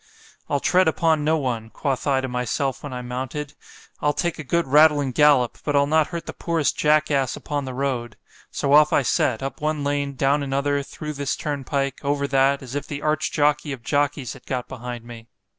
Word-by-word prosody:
—I'll 145 - +1
tread 185 +5 +3
upon 160 -1 +2
no 160 +2 +2
one——quoth 130 +1 -3
I 135 -2 +2
to 130 - -3
myself 125 +2 -2
when 145 - -7
I 125 -1 -5
mounted——I'll 135 +3 -5
take 170 0 -2
a - - -4
good 170 +5 0
rattling 145 0 +4
gallop; 140 -2 +3
but 145 - -1
I'll 140 0 +4
not 155 +1 +2
hurt 170 -2 -6
the - - -6
poorest 165 -4 0
jack 155 0 +2
ass 135 -3 +1
upon 145 -2 -4
the 130 - -5
road.——So 130 +1 -3
off 150 +1 +6
I 140 - +3
set——up 135 +4 0
one 155 -1 -1
lane——down 140 0 0
another, 140 +1 0
through 150 +2 -7
this 140 -1 -2
turnpike——over 140 0 -2
that, 135 +1 +2
as 130 -1 -9
if 145 - -3
the 145 0 -6
arch 155 0 0
jockey 150 0 +1
of 125 -3 -9
jockeys 145 -2 0
had - - -16
got 125 -2 -3
behind 120 -2 -7
me. 115 -1 -11
140 Hz, 185 wpm, -23 LUFS, 130-150 Hz, -, off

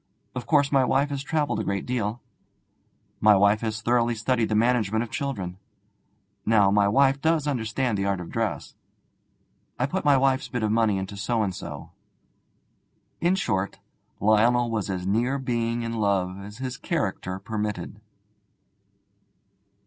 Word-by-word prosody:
Of 120 -2 -6
course, 145 -2 +3
my 135 -2 +4
wife 140 +3 +1
has 140 -1 -2
travelled 145 -6 -1
a - - -1
great 100 -1 -2
deal. 120 -2 -2 1.0
My 105 -1 +6
wife 100 +2 +4
has 110 -1 -3
thoroughly 120 +1 +2
studied 115 0 0
the 110 - +1
management 110 -1 +2
of 120 - -9
children. 95 -10 -4 0.8
Now, 105 -3 +4
my 100 0 +4
wife 135 +6 +3
does 160 -2 +2
understand 120 -4 -1
the 100 - 0
art 100 -2 0
of 90 - -8
dress. - - -2 1.0
I 125 - +1
put 185 +8 -2
my 145 -2 +5
wife's 135 0 +2
bit 125 -2 -3
of 105 - +1
money 110 -3 +2
into 95 +1 -5
so 110 +3 0
and 95 -3 -2
so.' - - -8 1.3
In 175 +2 +2
short, 100 - -1 0.4
Lionel 115 +3 +3
was 105 -3 -2
as 90 -2 -3
near 120 +8 +1
being 120 -3 -1
in 115 0 -3
love 100 -4 0
as 105 +2 -10
his 130 0 -5
character 105 - -2
permitted. 105 -1 -4
115 Hz, 155 wpm, -25 LUFS, 100-130 Hz, 1.3 s, My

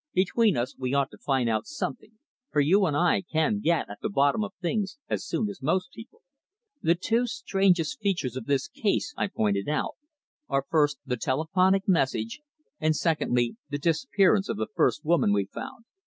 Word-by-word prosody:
"Between 195 - +3
us 120 +2 -2
we 130 +1 -1
ought 140 -1 +1
to - - -13
find 135 -4 0
out 110 -2 0
something, 150 - -5 0.4
for 150 - +1
you 185 +7 +4
and 145 -2 0
I 175 +4 +3
can 160 +7 +1
get 170 -5 +1
at - - -9
the - - -2
bottom 145 +3 +2
of - - -4
things 195 +5 -2
as - - -2
soon 220 - -1
as 200 -5 -8
most 180 +6 0
people." 225 +2 -13 0.6
"The 165 +1 +3
two 225 +7 0
strangest 195 - +1
features 180 -11 -1
of 130 -3 -6
this 140 -2 +1
case," 280 +3 -1
I - - 0
pointed 105 - -1
out, 150 - -2 0.5
"are 135 0 0
first 150 -3 +2
the 125 -2 -2
telephonic 180 +10 +1
message, 135 - 0 0.4
and 155 0 +2
secondly, 125 -8 0
the 145 - -2
disappearance 195 - +2
of 225 - -2
the 215 - -3
first - - +1
woman 155 -10 +3
we 100 -1 +1
found." 230 - -9
165 Hz, 185 wpm, -27 LUFS, 135-195 Hz, 0.6 s, you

